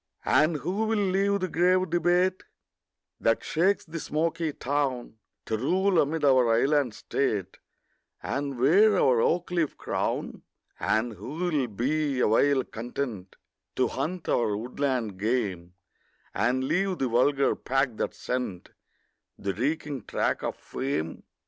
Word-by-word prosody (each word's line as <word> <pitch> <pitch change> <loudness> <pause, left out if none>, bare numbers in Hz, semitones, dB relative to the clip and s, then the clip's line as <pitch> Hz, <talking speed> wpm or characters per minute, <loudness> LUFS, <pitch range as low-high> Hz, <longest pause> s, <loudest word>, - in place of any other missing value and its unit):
And 155 +2 +3
who 190 +9 -2
will 220 0 +1
leave 200 0 +1
the 185 - 0
grave 180 +1 +2
debate 175 +2 +2 0.8
That 115 0 +1
shakes 185 +5 +1
the 165 0 -6
smoky 165 +1 -1
town, 135 -5 -2 0.3
To 110 - -1
rule 185 - +2
amid 150 +1 -1
our 130 -4 +5
island 135 -1 +2
state, 105 -7 -2 0.6
And 140 -1 -3
wear 195 - +5
our 125 -3 +4
oak 175 +6 +1
leaf 170 -4 0
crown? - - -3 0.4
And 115 +1 0
who 105 +8 -8
will 160 -6 0
be 135 +5 -1
awhile 130 +4 +3
content 115 -5 -5 0.4
To - - +2
hunt 180 +1 -4
our 105 -4 +1
woodland 120 -3 -2
game, 100 -6 -2 0.6
And 130 +2 +1
leave 185 +6 0
the 135 - 0
vulgar 135 +4 +2
pack 135 -3 -1
that - - -2
scent 125 -8 -4 0.7
The 100 0 -3
reeking 140 +1 -2
track - - -1
of - - -3
fame? 130 - -4
140 Hz, 130 wpm, -27 LUFS, 120-170 Hz, 0.8 s, our